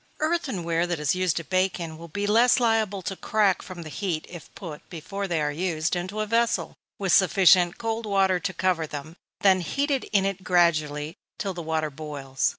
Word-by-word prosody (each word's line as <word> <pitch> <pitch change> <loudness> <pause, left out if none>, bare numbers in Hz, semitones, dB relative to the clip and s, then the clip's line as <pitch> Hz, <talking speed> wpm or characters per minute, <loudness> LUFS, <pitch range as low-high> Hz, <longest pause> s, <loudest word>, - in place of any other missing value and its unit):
_ - - -37 0.2
Earthen 310 - -1
ware 170 +1 0
that 175 -3 -2
is 150 -2 +1
used 185 -3 0
to 165 - -2
bake 185 +1 0
in, 165 -2 -5
will 165 +1 -10
be 205 +6 -3
less 230 +5 +4
liable 220 -5 +1
to 190 - -3
crack 205 -1 +1
from 180 -3 -8
the 155 - -8
heat 170 -2 -3
if 175 -2 -11
put, 160 -6 -8
before 195 +4 -5
they 170 -3 0
are 150 -1 0
used, 160 +1 -1
into 185 +4 -3
a - - 0
vessel, 230 +2 0 0.2
with 195 -2 0
sufficient 180 -1 +5
cold 225 -1 -3
water 190 -2 +2
to 190 - -2
cover 180 -4 0
them, 150 +2 -7 0.3
then 190 -2 +5
heated 275 - -1
in 195 -2 +1
it 195 -1 -3
gradually, 155 -4 +1 0.2
till 195 -2 -3
the 175 - -6
water 160 -1 -1
boils. 140 -3 -2
180 Hz, 205 wpm, -25 LUFS, 160-200 Hz, 0.3 s, sufficient